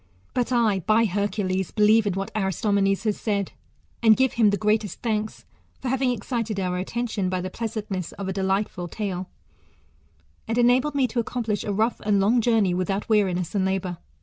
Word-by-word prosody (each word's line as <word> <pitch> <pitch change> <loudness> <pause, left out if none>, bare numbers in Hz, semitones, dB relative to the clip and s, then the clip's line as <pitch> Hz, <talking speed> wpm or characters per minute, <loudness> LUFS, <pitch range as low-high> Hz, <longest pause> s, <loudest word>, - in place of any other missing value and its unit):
But 245 0 -1
I, 225 -5 +2
by 215 +5 +3
Hercules, 190 -2 -1
believe 215 0 +4
in 200 - +1
whac 195 +1 -4
Aristomenes 195 0 +1
has 215 -2 -1
said, 200 -3 -1 0.5
and 220 -2 +6
give 265 0 +2
him 225 -3 +4
the 205 - +1
greatest 210 0 0
thanks, 215 -2 -2 0.3
for 255 - -3
having 260 0 +1
excited 230 -2 -2
our 180 -1 -1
attention 210 -1 -2
by 185 0 -1
the 185 +1 -4
pleasantness 210 -5 -4
of 200 - -6
a 190 - -2
de 195 - -2
lightful 190 -2 -1
tale; 190 -3 -4 1.2
and 225 +1 -1
enabled 250 +4 +3
me 275 -2 +3
to 240 0 -2
accomplish 230 -2 -2
a 205 - -2
rough 220 +4 0
and' 205 -1 +2
long 225 +5 +3
journey 220 -5 +2
without 195 +4 -2
weariness 185 -5 +1
and 200 -2 +1
labour. 190 -2 -2
210 Hz, 180 wpm, -24 LUFS, 190-230 Hz, 1.2 s, and